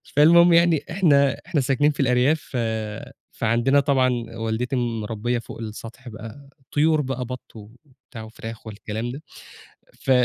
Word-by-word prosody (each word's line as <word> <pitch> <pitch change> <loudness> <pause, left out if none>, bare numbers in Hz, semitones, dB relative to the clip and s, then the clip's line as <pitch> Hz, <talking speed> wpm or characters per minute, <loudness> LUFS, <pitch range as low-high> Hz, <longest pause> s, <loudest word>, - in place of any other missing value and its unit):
فالمهم 170 +3 +7
يعني، 170 -2 +4
إحنا 145 -6 +3
إحنا 150 - +1
ساكنين 140 +3 +2
في 145 - -12
الأرياف، 130 +3 +3
ف 130 - -2 0.7
فعندنا 120 +5 +2
طبعًا، 135 -3 +2 0.3
والدتي 115 +3 -2
مربِّية 115 -1 -2
فوق 115 - -10
السطح 115 +3 -8
بقى، 115 +6 -10 0.2
طيور 155 +1 +3
بقى، 130 -2 -3
بَطّ 125 0 -9
وبتاع 120 +2 -13
وفراخ 110 +1 -9
والكلام 110 +2 -5
ده. 140 +4 -8 0.7
ف 135 - -3
125 Hz, 135 wpm, -23 LUFS, 115-145 Hz, 0.7 s, فالمهم